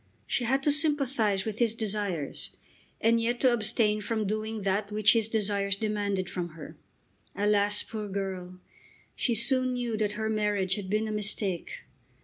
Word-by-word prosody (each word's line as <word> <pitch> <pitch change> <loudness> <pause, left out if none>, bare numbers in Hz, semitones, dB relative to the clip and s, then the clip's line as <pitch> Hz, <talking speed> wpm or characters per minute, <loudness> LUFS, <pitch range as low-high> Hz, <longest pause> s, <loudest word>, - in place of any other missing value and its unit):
She 245 - -1
had 270 +3 +1
to 295 - +3
sympathise 275 -10 +1
with 220 -1 -4
his 230 -2 +2
desires 200 -9 -2 0.5
and 230 +1 +3
yet 240 +1 0
to 255 -2 +5
abstain 215 -1 +3
from 215 +1 -1
doing 215 +1 -3
that 200 +2 0
which 210 -1 +5
his 225 -2 +2
desires 200 -3 0
demanded 205 -3 -1
from 175 -1 -4
her. 155 - -9 0.6
Alas, 205 0 +3
poor 215 -2 -5
girl! 190 -2 -5 0.6
She 235 - +1
soon 255 +2 +2
knew 240 -2 -2
that 210 -1 0
her 220 +1 -2
marriage 210 -3 0
had 190 -2 -4
been 215 +2 0
a - - -3
mistake. 205 -4 -1
210 Hz, 160 wpm, -28 LUFS, 200-230 Hz, 0.6 s, to